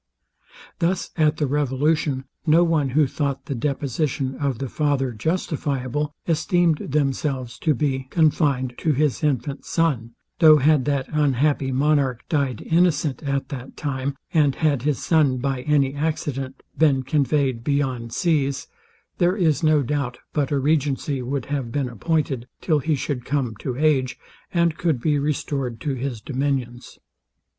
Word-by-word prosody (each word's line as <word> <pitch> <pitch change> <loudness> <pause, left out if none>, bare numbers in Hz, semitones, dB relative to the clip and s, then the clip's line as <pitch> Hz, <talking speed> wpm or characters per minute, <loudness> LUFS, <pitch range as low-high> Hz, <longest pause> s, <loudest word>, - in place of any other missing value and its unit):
Thus 180 +2 0
at 155 -2 +2
the 150 - +1
revolution, 145 0 0 0.2
no 160 +3 +6
one 160 -5 +1
who 150 +4 +3
thought 140 0 -2
the - - -3
deposition 135 +1 -1
of 140 -4 -1
the 135 - -3
father 140 -2 0
justifiable, 145 - -2 0.2
esteemed 165 0 +2
themselves 135 -3 -1
to 155 -3 +2
be 135 -1 -1
confined 145 -6 +2
to 155 - +1
his 145 +1 0
infant 140 -1 -1
son; 125 -9 -1 0.2
though 155 -2 +8
had 150 -1 +3
that 140 -2 0
unhappy 145 -2 +1
monarch 135 -2 +1
died 140 -7 0
innocent 160 -5 +1
at 140 -2 -2
that 135 -3 -8
time, 140 -1 -3 0.2
and 145 -4 +3
had 145 -5 +1
his 145 0 0
son, 150 -6 +3
by 135 0 -2
any 140 -1 +2
accident, 140 -3 -3
been 140 -4 +3
conveyed 135 -3 +1
beyond 130 -5 -1
seas, 145 -5 0 0.5
there 180 +2 +3
is 165 -5 +2
no 155 -3 +3
doubt 130 -2 -2 0.2
but 145 -3 0
a 145 - +1
regency 140 -1 0
would 130 0 -3
have 135 -5 -3
been 140 -1 -1
appointed 135 +1 -1
till 155 -4 +1
he 155 +2 0
should 135 -2 -3
come 130 -3 -1
to 125 +3 -4
age, 135 -4 +2 0.3
and 170 -2 +1
could 160 -7 +1
be 150 +3 +1
restored 140 -4 -2
to 140 +3 -2
his 130 -3 -4
dominions. 130 -3 -3
140 Hz, 150 wpm, -23 LUFS, 130-155 Hz, 0.5 s, though